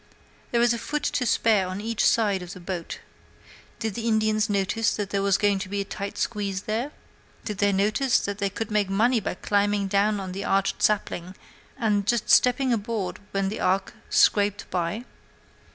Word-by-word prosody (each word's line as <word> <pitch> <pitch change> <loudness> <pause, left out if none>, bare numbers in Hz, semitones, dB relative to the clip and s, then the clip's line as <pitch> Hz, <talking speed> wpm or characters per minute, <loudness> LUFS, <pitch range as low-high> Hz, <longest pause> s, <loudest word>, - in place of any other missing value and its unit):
There 235 0 +2
is 240 -1 +4
a 235 - -3
foot 300 +4 -3
to 275 -4 0
spare 215 -5 +3
on 185 +1 -5
each 225 +1 -1
side 205 -4 +3
of 180 +1 -8
the 185 - -10
boat. 175 -1 -5 0.8
Did 220 -2 -3
the 230 +3 -4
Indians 215 -1 +2
notice 205 +3 +1
that 205 -2 -4
there 200 - 0
was 200 -1 +3
going 205 -2 +2
to 190 -1 -5
be 200 +1 -2
a 200 - -2
tight 200 0 -6
squeeze 200 -3 -2
there? 230 +7 -2 0.5
Did 210 -4 -4
they 205 0 +3
notice 215 +7 +2
that 200 0 -4
they 200 -1 0
could 220 +2 -5
make 210 -2 +1
money 230 +5 +3
by 200 - -3
climbing 205 +1 +1
down 205 +1 +2
out 190 -1 -5
of - - -6
that 195 +2 -4
arched 195 0 +1
sapling 185 -3 0 0.4
and 210 -5 0
just 235 -1 +1
stepping 250 0 +4
aboard 210 -4 -3
when 195 -1 -1
the 215 - -5
ark 190 +1 0 0.2
scraped 205 0 +3
by? 180 +6 -2
205 Hz, 195 wpm, -25 LUFS, 195-225 Hz, 0.8 s, is